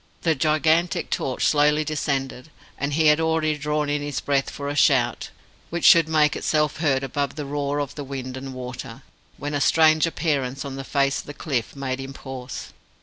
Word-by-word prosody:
The 165 - +3
gigantic 155 +3 +1
torch 130 - -1
slowly 150 +1 +3
descended, 140 -2 -3 0.3
and 140 +1 -3
he 160 +2 +2
had 150 +1 +5
already 160 -1 +1
drawn 150 0 -1
in 145 0 -1
his 145 -1 -3
breath 140 -1 0
for 140 - -6
a 145 - -3
shout 125 -6 +2 0.4
which 170 +1 -2
should 165 -3 +7
make 150 -2 +3
itself 150 -1 0
heard 140 -4 +1
above 140 +1 -2
the 150 - -5
roar 145 0 -2
of 145 -2 -3
the 145 - -6
wind 130 -2 -6
and 130 0 -7
water, 125 0 -7 0.3
when 145 +1 -4
a 145 - 0
strange 155 +1 +4
appearance 140 -5 -2
on 135 -1 -5
the 135 - -5
face 140 0 +1
of - - -9
the 145 - -8
cliff 130 -8 -3
made 135 -1 -3
him 135 0 -7
pause. 130 -2 -8
145 Hz, 195 wpm, -23 LUFS, 135-155 Hz, 0.4 s, should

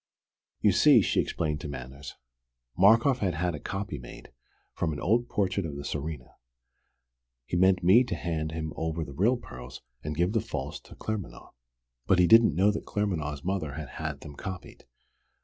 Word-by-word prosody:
"You - - +5
see," - - +6
she - - +1
explained 75 -1 -1
to - - -5
Manners, 70 +1 -8 0.6
"Markoff 115 +7 +5
had 95 -5 0
had 90 +1 -1
a 75 - -5
copy 95 -7 -4
made, - - -12 0.4
from 80 -2 -1
an 70 - -5
old 115 +7 +1
portrait 100 -1 0
of 75 -4 -5
the 70 - -6
Tsarina. 75 -3 -5 1.1
He 85 - -4
meant 95 +1 +4
me 100 +8 +7
to 90 - -3
hand 80 -1 -3
him 80 -1 -4
over 80 0 -2
the 70 - -9
real 110 - +2
pearls, 60 - -10 0.2
and 75 +1 -4
give 90 +3 +2
the 110 - +2
false 75 -9 -5
to - - -15
Claremanagh. 110 -4 -6 0.6
But 95 - +4
he 90 - +5
didn't 110 -4 +6
know 100 +4 +4
that 105 - -5
Claremanagh's 80 -9 -2
mother 90 -6 -2
had 75 0 -6
had 75 -2 -4
them 75 - -9
copied. 95 -5 -8
85 Hz, 180 wpm, -28 LUFS, 75-100 Hz, 1.1 s, me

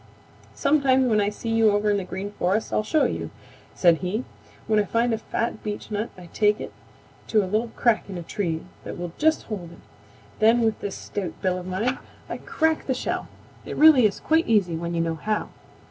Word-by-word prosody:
"Sometime 265 -3 +3
when 215 -2 +3
I 205 - +1
see 220 +2 -6
you 225 -1 +4
over 205 0 +2
in 205 - +2
the 195 - -2
Green 190 +2 -5
Forest 205 +2 -1
I'll - - +3
show 295 +9 +2
you," - - -2 0.5
said 170 -3 +5
he. 185 +8 -2 0.4
"When 215 -1 +2
I - - +3
find 230 +4 +1
a 220 - -1
fat 230 0 -3
beechnut 210 +1 -3
I 180 -1 -11
take 210 0 +3
it - - -7 0.5
to 215 -2 +3
a - - -2
little 215 +5 0
crack 230 -4 +2
in 190 - -5
a 175 - -5
tree 165 -3 -2 0.2
that - - -7
will 175 -1 -5
just 315 +1 +3
hold 180 -6 -6
it; - - -15 0.6
then 225 +2 +5
with 220 -2 +1
this 200 - -4
stout 200 -3 -5
bill 185 -1 +1
of 180 - -8
mine 220 +8 -1 0.3
I - - -4
crack 320 -1 0
the 260 - +1
shell. - - -3 0.4
It - - -6
really 295 -7 +8
is 195 - -6
quite 320 +1 +2
easy 200 -7 +2
when 170 +1 -3
you 165 - +1
know 165 0 0
how. 215 +6 -2
210 Hz, 210 wpm, -24 LUFS, 185-230 Hz, 0.6 s, really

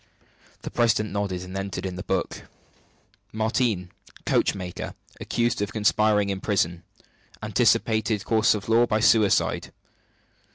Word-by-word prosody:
The - - -6
president 110 -2 +1
nodded, 100 -3 -2
and 90 +1 -9
entered 95 0 -4
in 95 -1 -4
the 90 - -6
book: - - -3 0.9
"Martigne, 110 -4 0 0.4
coachmaker. 90 -2 -1 0.2
Accused 120 -2 -1
of 105 0 -2
conspiring 105 -1 +2
in 95 -1 -4
prison. 85 -5 0 0.6
Anticipated 110 -2 +1
course 110 -1 +3
of 105 - -6
law 115 +2 +4
by 110 - +1
suicide. 110 -2 +2
105 Hz, 120 wpm, -25 LUFS, 95-110 Hz, 0.9 s, law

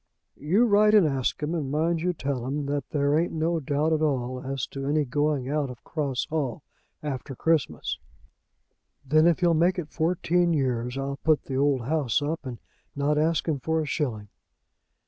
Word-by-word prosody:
"You 185 +11 +3
write 210 -1 +5
and 205 -5 +6
ask 135 0 -1
him, 150 +3 -1
and 155 -6 -2
mind 160 +3 0
you 180 +1 +1
tell 140 -6 -3
him 145 +2 -2
that 140 -1 -3
there 145 0 +1
ain't 170 - -1
no 165 +1 0
doubt 150 +2 0
at 155 - +1
all 130 -4 -1
as 135 -1 -3
to 135 0 -5
any 150 +1 +2
going 145 0 0
out 145 -1 -1
of 125 -2 -10
Cross 140 -5 -2
Hall 145 -3 -2 0.4
after 135 -2 -4
Christmas. 160 +1 0 1.1
Then, 155 +4 +4
if 170 +1 +2
he'll 175 -1 +4
make 175 +4 +3
it 160 -4 -5
fourteen 175 +1 +1
years, 125 -3 -1
I'll 140 0 -3
put 155 -2 +3
the 135 - -5
old 140 -2 +2
house 140 -1 0
up 150 +2 -3
and 120 -2 -6 0.4
not 145 +1 +1
ask 160 +2 +1
him 150 -4 0
for 160 +4 0
a 155 - -1
shilling. 120 -9 -3
150 Hz, 185 wpm, -26 LUFS, 135-160 Hz, 1.1 s, and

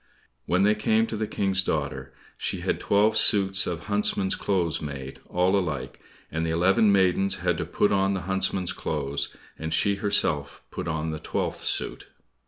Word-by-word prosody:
When 90 +2 +2
they 105 +1 +5
came 110 +1 +2
to 115 - -5
the 110 0 -2
King's 95 -2 +1
daughter, 70 -6 -3 0.2
she - - -3
had - - -1
twelve 105 +2 +2
suits 95 -3 +3
of 85 -2 -3
huntsmen's 100 -2 +1
clothes 90 -5 -1
made, 70 -3 -7
all 90 +2 +2
alike, 85 -7 -2 0.3
and 80 0 -2
the 80 - -1
eleven 95 +5 +3
maidens 95 0 +3
had - - 0
to - - -2
put 105 - +1
on 95 0 +2
the 95 - -3
huntsmen's 95 0 0
clothes, 70 -2 -2 0.3
and 80 0 -4
she 100 +5 +2
herself 80 -8 0
put - - -5
on 80 0 -2
the 80 - -5
twelfth - - -3
suit. - - -2
95 Hz, 175 wpm, -26 LUFS, 80-100 Hz, 0.3 s, they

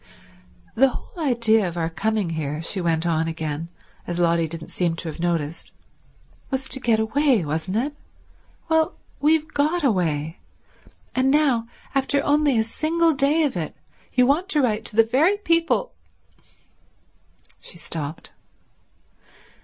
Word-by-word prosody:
"The 270 +4 +5
whole 330 +5 -7
idea 225 -5 +3
of 175 0 -6
our 165 -1 0
coming 200 +2 -1
here," 150 -2 -3
she 190 +3 -2
went 165 -1 0
on 165 -1 +1
again, 160 0 -4 0.4
as 175 - -3
Lotty 170 -1 +2
didn't 160 0 -8
seem 170 -2 0
to 165 - -4
have 155 - -8
noticed, 165 -2 -2 0.8
"was 265 -1 -2
to 265 - 0
get 230 -4 +2
away, 235 - +2
wasn't 160 +7 -2
it? 285 +5 -1 0.7
Well, 320 0 +2 0.2
we've 310 +1 +3
got 310 +4 +1
away. 165 - 0 0.7
And 260 +1 +2
now, 270 -6 +2 0.3
after 275 +1 +1
only 290 -3 +3
a 220 - +3
single 325 +8 +1
day 285 +3 +2
of 285 -7 0
it, 165 -3 -4 0.4
you 250 0 +5
want 315 +9 +1
to 300 -6 +2
write 220 -3 0
to 210 - -7
the 225 - +7
very 310 - +3
people—" 335 +5 +1 1.7
She - - -8
stopped. 155 -1 -5
225 Hz, 145 wpm, -23 LUFS, -, 1.7 s, the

